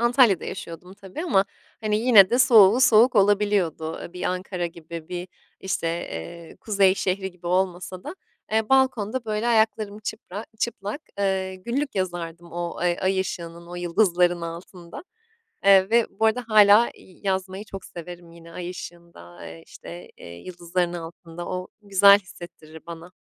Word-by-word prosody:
Antalya'da 235 -5 +4
yaşıyordum 180 +1 -8
tabii 195 - -8
ama, 195 - +3 0.4
hani, 210 -1 0
yine 220 -5 +6
de 245 - +2
soğuğu 230 -2 +6
soğuk 245 0 +5
olabiliyordu. 195 -5 +1
Bir 180 - -8
Ankara 180 -1 -2
gibi, 165 0 -10
bir 180 0 -6 0.3
işte, 190 -3 -2
eee, 165 - -6
kuzey 195 -3 +3
şehri 190 0 -2
gibi 175 -1 -13
olmasa 185 0 -1
da, - - -6 0.4
eee, 220 -1 +1
balkonda, 260 -3 +1
böyle, 215 +1 -2
ayaklarım 220 -2 +1
çıpra 215 -1 -7
çıplak, 220 +2 -3 0.2
ııı, 190 -1 -1
günlük 245 +10 -3
yazardım 175 -3 -4
o 175 0 -4
ay 175 -1 0
ay 190 0 +1
ışığının, 170 -2 -6
o 175 - -9
yıldızların 175 -1 +1
altında. 170 - -9 0.6
Eee, 195 0 +6
ve 235 -1 +4
bu 210 +3 -3
arada 240 +3 0
hâlâ, 210 +2 +6
iii, 190 +2 -16
yazmayı 190 +1 -2
çok 195 -2 -9
severim 175 0 -10
yine 170 0 -14
ay 180 0 -6
ışığında, 170 - -11
eee, 80 0 -11
işte, 85 +1 -11
eee, - - -13
yıldızların 175 - -3
altında. 170 0 -8
O 180 0 -4
güzel 200 0 +6
hissettirir 165 -4 -13
bana. 170 +1 -10
185 Hz, 150 wpm, -24 LUFS, 170-210 Hz, 0.6 s, yine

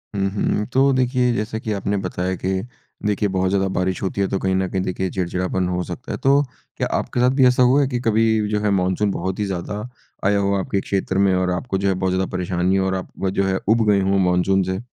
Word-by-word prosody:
हुँ, 100 0 +1
हुँ। 105 0 0
तो 135 +1 +4
देखिए, 125 -1 +2
जैसा 110 0 -3
कि 110 - -4
आपने 100 0 -1
बताया 90 +1 -2
कि 95 +1 -2 0.5
देखिए, 105 0 +1
बहुत 95 -1 0
ज़्यादा 95 0 +1
बारिश 90 0 -1
होती 100 +1 -1
है 95 - +2
तो 95 - -1
कहीं 95 0 0
न 95 0 +1
कहीं 95 0 -1
देखिए 95 0 -2
चिड़चिड़ापन 90 0 -1
हो 90 0 -1
सकता 90 +10 -7
है। - - -3
तो, 140 +1 +4 0.4
क्या - - 0
आपके - - -3
साथ 125 +1 +4
भी 135 -2 +5
ऐसा 125 0 +4
हुआ 130 +4 +4
है 135 - +2
कि 125 -2 -2
कभी 110 -1 +2
जो 105 -1 0
है 105 - +1
मानसून 95 +2 +1
बहुत 95 +1 -3
ही 105 - 0
ज़्यादा 95 +2 -4 0.5
आया 100 +1 +3
हो 100 0 +1
आपके 100 +1 -1
क्षेत्र 95 -1 -2
में 100 -1 +3
और 90 0 +1
आपको 95 +3 -2
जो 100 +1 -1
है 95 - +3
बहुत 95 0 -1
ज़्यादा 95 0 0
परेशानी 90 0 0
हो 95 -1 +1
और 95 0 0
आप 95 +1 -4
जो 95 +1 0
है 95 0 +1
ऊब 115 0 +4
गए 100 -1 +4
हो 95 +1 +2
मानसून 95 +1 +2
से? 95 +1 -2
95 Hz, 250 wpm, -21 LUFS, 95-105 Hz, 0.5 s, भी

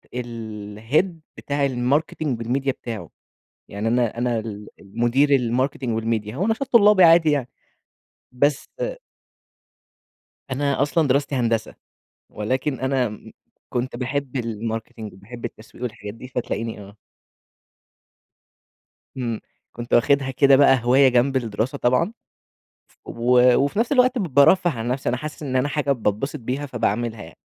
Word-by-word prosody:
الhead 115 - -2 0.3
بتاع 140 0 -1
الماركتينج 135 +1 -1
والميديا 135 +4 -1
بتاعه، 115 -4 -7 0.6
يعني 105 +3 -3
أنا 120 -1 0
أنا 120 -1 0
ال 105 -2 -7
المدير 120 +8 +1
الماركتينج 125 -1 0
والميديا 110 0 -2
هو 190 +6 0
نشاط 225 +5 -1
طلابي 210 -4 +7
عادي 165 -1 +6
يعني، 135 -4 -1 0.8
بس 140 +3 +1 1.9
أنا 140 0 0
أصلًا 150 +2 +2
دراستي 140 +1 +1
هندسة، 115 -3 -1 0.5
ولكن 130 +6 -2
أنا 130 -1 +1
إمم 105 -1 -10 0.4
كنت 125 +1 -3
باحب 135 +2 -3
الماركتينج، 110 -2 -5
وباحب 115 +6 -10
التسويق 115 +1 -10
والحاجات 105 -3 -6
دي 120 +3 -11
فتلاقيني 115 -3 -4
آه. 100 +1 -13 2.2
إمم 120 -3 -2 0.4
كنت 120 0 -6
واخدها 135 +2 +3
كده 135 +1 +5
بقى 135 -1 +5
هواية 130 +2 +5
جنب 125 +2 +2
الدراسة 115 +3 -2
طبعًا 135 - +1 0.7
ف - - -29
و 125 +1 +3
وفي 145 +9 0
نفس 235 +5 +1
الوقت 255 -1 +4
ب 210 - 0
بارفّه 175 +5 +5
عن 120 -5 -4
نفسي 130 0 -2
أنا 125 - 0
حاسس 155 +3 -7
إن 130 -2 -2
أنا 130 +3 +1
حاجة 145 -2 0
باتبسط 115 +3 -2
بيها 130 +5 -3
فباعمِلها 115 -2 -2
يعني، - - -13
125 Hz, 135 wpm, -22 LUFS, 115-140 Hz, 2.2 s, طلابي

